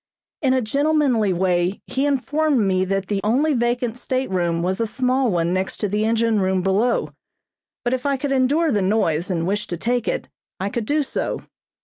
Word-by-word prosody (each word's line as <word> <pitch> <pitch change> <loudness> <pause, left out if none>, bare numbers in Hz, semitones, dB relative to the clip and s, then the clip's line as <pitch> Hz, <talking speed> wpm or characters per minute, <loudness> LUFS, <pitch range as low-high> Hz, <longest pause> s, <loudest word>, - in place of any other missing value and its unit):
In 260 -3 +3
a 260 - +1
gentlemanly 275 -4 +2
way 180 +1 +1
he 275 +2 -1
informed 285 0 +1
me 190 -2 +2
that 195 0 -1
the 200 0 -2
only 270 +9 +2
vacant 240 -1 -1
stateroom 180 -11 -1
was 185 +3 -1
a 230 - +1
small 255 +2 +1
one 170 -2 0
next 185 +1 -2
the 210 +2 0
engine 225 -1 +2
room 190 -1 +1
below, 205 +6 +1 0.7
but 245 - 0
if 255 -1 -2
I 280 -1 +1
could 275 +1 -3
endure 285 +5 +2
the 210 -4 +1
noise 185 -4 +1
and 165 -3 -1
wished 205 +3 -2
to 175 - -3
take 240 +5 -1
it, - - -2 0.3
I 195 +2 -1
could 225 0 -3
do 300 +1 +2
so. - - -3
225 Hz, 190 wpm, -22 LUFS, 190-260 Hz, 0.7 s, In